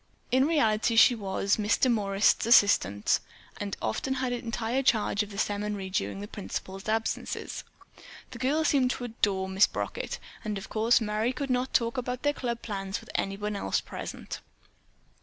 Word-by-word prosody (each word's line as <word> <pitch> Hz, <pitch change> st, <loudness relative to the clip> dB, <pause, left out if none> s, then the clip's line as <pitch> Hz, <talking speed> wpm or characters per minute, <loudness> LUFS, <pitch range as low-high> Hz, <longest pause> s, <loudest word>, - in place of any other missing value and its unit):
In 260 Hz, +2 st, +4 dB
reality 230 Hz, -8 st, +2 dB
she 245 Hz, +2 st, +8 dB
was 200 Hz, -1 st, 0 dB
Miss 210 Hz, +1 st, +2 dB
Demorest's 210 Hz, -4 st, +2 dB
assistant 105 Hz, -, +4 dB, 0.4 s
and 200 Hz, -1 st, -4 dB
often 265 Hz, -, -1 dB
had 255 Hz, -1 st, -1 dB
entire 235 Hz, +1 st, -1 dB
charge 220 Hz, -5 st, +2 dB
of 210 Hz, -, -4 dB
the 200 Hz, -, -9 dB
seminary 205 Hz, -2 st, -2 dB
during 100 Hz, -, -2 dB
the 105 Hz, -, -6 dB
principal's 190 Hz, -, -6 dB
absences. 225 Hz, +1 st, -2 dB, 0.7 s
The -, -, -9 dB
girls 295 Hz, +4 st, +2 dB
seemed 265 Hz, -3 st, +3 dB
to 250 Hz, -, -3 dB
adore 205 Hz, -5 st, 0 dB
Miss 190 Hz, +1 st, +4 dB
Brockett, -, -, -4 dB, 0.3 s
but 210 Hz, -2 st, -2 dB
of 195 Hz, -, -8 dB
course 225 Hz, +2 st, +3 dB
Merry 215 Hz, +2 st, 0 dB
could 265 Hz, +1 st, -3 dB
not 250 Hz, +1 st, 0 dB
talk 235 Hz, +1 st, +1 dB
about 250 Hz, 0 st, -4 dB
their 290 Hz, 0 st, +2 dB
club 235 Hz, -4 st, -4 dB
plans 195 Hz, -2 st, -3 dB
with -, -, -12 dB
anyone 205 Hz, +1 st, -2 dB
else 200 Hz, -, 0 dB
present. -, -, -7 dB
220 Hz, 160 wpm, -28 LUFS, 200-250 Hz, 0.7 s, she